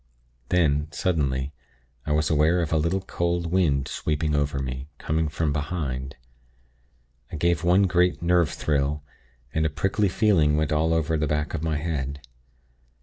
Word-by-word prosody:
Then, 75 -4 +2
suddenly, 70 -5 -1 0.5
I - - 0
was 75 +1 +1
aware 80 +3 +3
of 80 - -3
a - - +3
little, 85 +5 0
cold 85 -2 -2
wind 75 -7 +2
sweeping 75 0 -1
over 75 -1 0
me, 65 +1 -4
coming 80 0 -1
from 75 0 -1
behind. 70 -4 -3 1.2
I - - -5
gave 85 0 +1
one 90 +3 +4
great 90 -1 +2
nerve 85 -2 +3
thrill, 75 0 -1 0.5
and 80 - +1
a 80 - +2
prickly 95 +6 0
feeling 85 -8 +3
went 75 -1 0
all 80 +2 +2
over 80 0 +1
the 75 0 0
back 75 0 -1
of - - -2
my 80 -2 -1
head. 70 -3 -3
75 Hz, 155 wpm, -25 LUFS, 75-85 Hz, 1.2 s, one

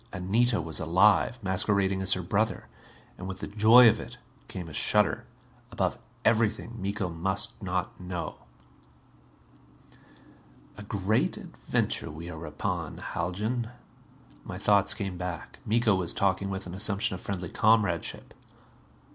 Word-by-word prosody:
Anita 110 +6 +1
was 80 -1 0
alive. 95 +8 +3
Masquerading 95 0 +1
as 95 0 +4
her 90 - -2
brother. 110 +5 0 0.5
And, 95 - -6
with 95 -1 -5
the - - -5
joy 110 +4 +7
of 110 - +4
it, - - -9 0.3
came 90 -2 -7
a 80 - -10
shudder. - - +2 0.4
Above - - 0 0.3
everything, 115 0 +1
Miko 100 0 -2
must 95 +6 -2
not 90 -2 -3
know. 90 -1 -5 2.4
"A 110 - -10
great 100 +1 0
adventure - - -2
we 80 +3 -8
are 80 0 -7
upon, 75 0 -3
Haljan." 110 +7 -3 0.7
My - - -7
thoughts 100 -1 +3
came 95 -3 -4
back. 90 -2 -6
Miko 115 0 +3
was 90 -3 -1
talking 100 0 0
with 95 0 -4
an 90 - -8
assumption 100 0 +1
of 90 - -6
friendly 90 -4 -4
comradeship. 105 -6 +1
95 Hz, 130 wpm, -28 LUFS, 90-105 Hz, 2.4 s, joy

